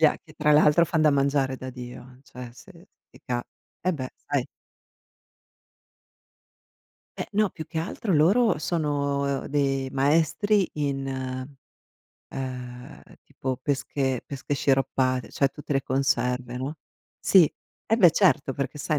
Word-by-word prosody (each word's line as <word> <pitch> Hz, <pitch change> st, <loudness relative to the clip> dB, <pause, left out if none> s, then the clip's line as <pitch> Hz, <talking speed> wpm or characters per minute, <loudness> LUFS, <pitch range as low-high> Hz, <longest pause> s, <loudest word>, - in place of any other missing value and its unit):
Ja 155 Hz, -2 st, +5 dB
che 155 Hz, -, -17 dB
tra 150 Hz, -1 st, +2 dB
l'altro 150 Hz, +2 st, +6 dB
fan 160 Hz, -1 st, 0 dB
da 155 Hz, -, +6 dB
mangiare 140 Hz, -1 st, +1 dB
da 130 Hz, 0 st, -7 dB
Dio, 125 Hz, 0 st, -10 dB
cioè, 125 Hz, -3 st, -10 dB
se 175 Hz, +8 st, -16 dB, 0.2 s
ti -, -, -18 dB
cap 120 Hz, -1 st, -2 dB, 0.4 s
Vabbè 160 Hz, -8 st, 0 dB
sai -, -, -2 dB, 2.7 s
Eh, -, -, -3 dB
no, 210 Hz, -1 st, +2 dB
più 160 Hz, -, -8 dB
che 160 Hz, -, -4 dB
altro 185 Hz, +4 st, -2 dB
loro 200 Hz, +10 st, +4 dB
sono 140 Hz, -3 st, -1 dB
de 135 Hz, -2 st, 0 dB
maestri 165 Hz, +9 st, +2 dB
in, 140 Hz, -2 st, -2 dB, 1.2 s
uhm, 125 Hz, -2 st, -7 dB, 0.2 s
tipo 130 Hz, -1 st, -4 dB
pesche 135 Hz, -2 st, -1 dB
pesche 140 Hz, +1 st, -4 dB
sciroppate, 130 Hz, -2 st, +1 dB
cioè, 140 Hz, -, +2 dB
tutte 145 Hz, +1 st, -5 dB
le 135 Hz, -, +1 dB
conserve, 125 Hz, -2 st, 0 dB
no? 135 Hz, +5 st, -4 dB, 0.4 s
Sì, 180 Hz, -6 st, +5 dB, 0.3 s
e 225 Hz, -, +2 dB
beh 180 Hz, -6 st, +8 dB
certo 165 Hz, -8 st, +3 dB
perché 140 Hz, +2 st, -4 dB
sai 150 Hz, +1 st, 0 dB
140 Hz, 130 wpm, -26 LUFS, 130-155 Hz, 2.7 s, beh